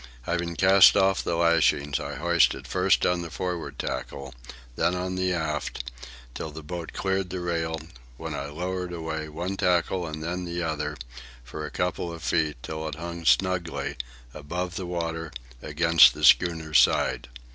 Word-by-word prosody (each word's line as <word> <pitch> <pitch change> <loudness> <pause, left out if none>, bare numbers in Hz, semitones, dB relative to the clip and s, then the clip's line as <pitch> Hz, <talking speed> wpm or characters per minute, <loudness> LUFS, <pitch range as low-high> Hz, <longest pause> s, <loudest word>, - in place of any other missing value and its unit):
Having 85 +2 -2
cast 95 +2 +7
off 95 -1 +3
the 85 - -1
lashings, 85 -4 +2
I - - -5
hoisted 85 +2 +2
first - - +2
on 90 -1 +1
the 85 - -6
forward 90 0 -4
tackle, 70 -1 -5 0.4
then 90 - +1
on 90 +1 -3
the 95 0 0
aft, 75 -7 -3 0.4
till 80 - -5
the 80 +1 -9
boat 85 +1 -6
cleared 95 -1 -1
the 95 - -4
rail, 80 -2 -2 0.4
when - - -5
I 70 - -4
lowered 90 +4 -4
away, 80 -2 -4
one 90 +5 -4
tackle 90 0 +1
and 80 0 -6
then 90 +2 -3
the 85 0 -3
other, 80 -2 -3 0.5
for 75 +5 -6
a - - -7
couple 90 -1 -2
of 85 -2 -9
feet, 75 +2 0
till 80 0 -4
it 75 - -5
hung 85 +1 -7
snugly, 95 -2 +1 0.4
above 90 +4 -4
the 95 -2 -4
water, 80 -2 -3 0.3
against 80 +2 +5
the - - 0
schooner's 80 -3 +5
side. - - +2
85 Hz, 165 wpm, -26 LUFS, 80-90 Hz, 0.5 s, cast